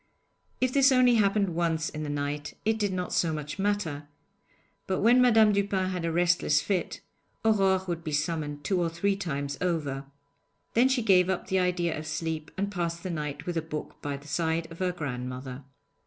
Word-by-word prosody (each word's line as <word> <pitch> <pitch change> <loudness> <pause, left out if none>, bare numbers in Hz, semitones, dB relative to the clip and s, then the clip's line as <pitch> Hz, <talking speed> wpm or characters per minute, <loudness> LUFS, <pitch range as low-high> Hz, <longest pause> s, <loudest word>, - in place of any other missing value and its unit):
If 255 0 +1
this 275 -1 +5
only 250 -2 +5
happened 200 -1 +2
once 165 -1 0
in 155 - -6
the 150 - -4
night 145 0 -3
it 220 0 +1
did 205 -2 +1
not 180 -1 -3
so 165 - +2
much 150 +2 -5
matter; 190 -8 -1 0.8
but 190 - 0
when 240 +4 +6
Madame 225 -3 +6
Dupin 195 -2 0
had 180 -2 -3
a 165 - 0
restless 175 -3 +3
fit, 185 +1 -2 0.4
Aurore 195 -3 +3
would 170 -1 -3
be 155 - -4
summoned 145 -1 -2
two 185 +3 +1
or 170 - +1
three 195 +5 0
times 145 -7 -4
over. 150 -6 -1 0.7
Then 245 +3 +4
she 260 -3 +1
gave 185 -3 +4
up 190 - -2
the 190 - +2
idea 180 -2 0
of 155 +1 -6
sleep, 160 -1 -3
and 200 +1 -1
passed 170 -3 -3
the 185 - -3
night 150 -3 -4
with 175 -1 -2
a - - +1
book 155 -1 -7
by 145 -1 -3
the 140 +1 -15
side 165 +1 -1
of 165 - -10
her 185 -1 +1
grandmother. 130 -4 -5
170 Hz, 195 wpm, -28 LUFS, 150-195 Hz, 0.8 s, when